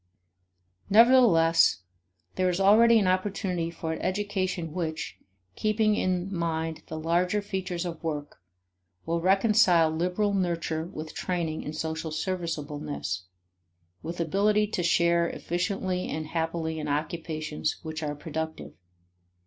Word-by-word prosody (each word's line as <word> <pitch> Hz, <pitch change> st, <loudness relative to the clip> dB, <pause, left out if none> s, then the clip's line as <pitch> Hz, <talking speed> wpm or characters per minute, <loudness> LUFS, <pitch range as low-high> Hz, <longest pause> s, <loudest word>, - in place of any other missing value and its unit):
Nevertheless, 195 Hz, -, +5 dB, 0.5 s
there 185 Hz, 0 st, +1 dB
is 180 Hz, +1 st, -1 dB
already 225 Hz, +4 st, +6 dB
an 210 Hz, -, +3 dB
opportunity 185 Hz, -2 st, 0 dB
for 160 Hz, -1 st, -4 dB
an -, -, -6 dB
education 185 Hz, -4 st, -2 dB
which, 160 Hz, -3 st, -4 dB, 0.4 s
keeping 215 Hz, 0 st, +2 dB
in 185 Hz, 0 st, -1 dB
mind 165 Hz, -1 st, -2 dB
the 160 Hz, -, -6 dB
larger 175 Hz, +5 st, +1 dB
features 190 Hz, -3 st, -3 dB
of 170 Hz, -2 st, -6 dB
work, 150 Hz, -, -4 dB, 0.6 s
will 165 Hz, +1 st, -1 dB
reconcile 190 Hz, -3 st, +4 dB
liberal 180 Hz, +5 st, 0 dB
nurture 170 Hz, -4 st, -1 dB
with 155 Hz, -3 st, -8 dB
training 170 Hz, -3 st, -2 dB
in 150 Hz, -, -6 dB
social 160 Hz, +1 st, -3 dB
serviceableness, 150 Hz, -, -3 dB, 0.8 s
with 170 Hz, +2 st, -6 dB
ability 205 Hz, +6 st, +2 dB
to 205 Hz, -3 st, -3 dB
share 170 Hz, 0 st, +3 dB
efficiently 185 Hz, +1 st, -2 dB
and 155 Hz, +1 st, -3 dB
happily 160 Hz, 0 st, -2 dB
in 150 Hz, -, -4 dB
occupations 155 Hz, 0 st, -2 dB
which 160 Hz, 0 st, -5 dB
are 150 Hz, -1 st, -3 dB
productive. 160 Hz, +1 st, -5 dB
170 Hz, 120 wpm, -27 LUFS, 160-190 Hz, 0.8 s, already